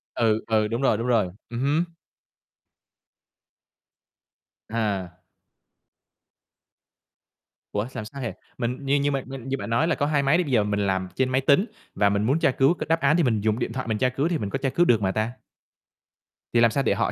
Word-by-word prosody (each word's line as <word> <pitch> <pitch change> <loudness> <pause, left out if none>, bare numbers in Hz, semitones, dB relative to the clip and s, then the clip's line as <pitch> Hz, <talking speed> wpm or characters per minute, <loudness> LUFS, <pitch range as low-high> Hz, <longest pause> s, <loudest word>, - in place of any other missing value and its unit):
Ừ, 110 -1 +2
ừ, 110 -1 +2
đúng 115 +4 -2
rồi, 130 -6 +3
đúng 115 +2 -3
rồi, 115 -6 +3 0.2
ừm 120 0 -5
hứm. 145 +5 +2 2.9
À. 100 -6 -2 2.6
Ủa, 105 +2 -1
xàm 110 -4 -7
sao 135 +6 -8
hệ? 120 - -3 0.2
Mình 125 +4 -3
như 135 +1 +2
như 145 0 +1
mà 135 -1 -1
mình 135 -1 -8
như 135 +1 -1
bạn 130 - -6
nói 115 +8 +2
là 170 - +1
có 145 - 0
2 145 -1 +1
máy 140 +4 +4
đi, 180 - +2
bây 145 - -5
giờ 115 -4 +4
mình 105 0 -1
làm 95 -1 0
trên 130 -1 +1
máy 130 +1 +1
tính 140 +9 +4 0.3
và 100 - +3
mình 100 +1 0
muốn 135 +8 +2
tra 140 - +3
cứu 135 +5 +3
cái - - -5
đáp 165 0 +3
án 150 +1 +3
thì 170 - +3
mình 110 -6 +1
dùng 110 +2 0
điện 115 - -2
thoại 130 -1 -4
mình 110 -2 0
tra 130 +4 +2
cứu 135 +4 -1
thì 170 -1 0
mình 105 -8 -3
có 135 - -2
tra 135 0 -1
cứu 175 +7 +2
được 115 -9 +3
mà 95 -1 +1
ta? 110 +3 -1 1.2
Thì 120 - +4
làm 115 -1 +5
sao 135 +5 0
để - - +2
họ - - 0
125 Hz, 215 wpm, -25 LUFS, 110-140 Hz, 2.9 s, làm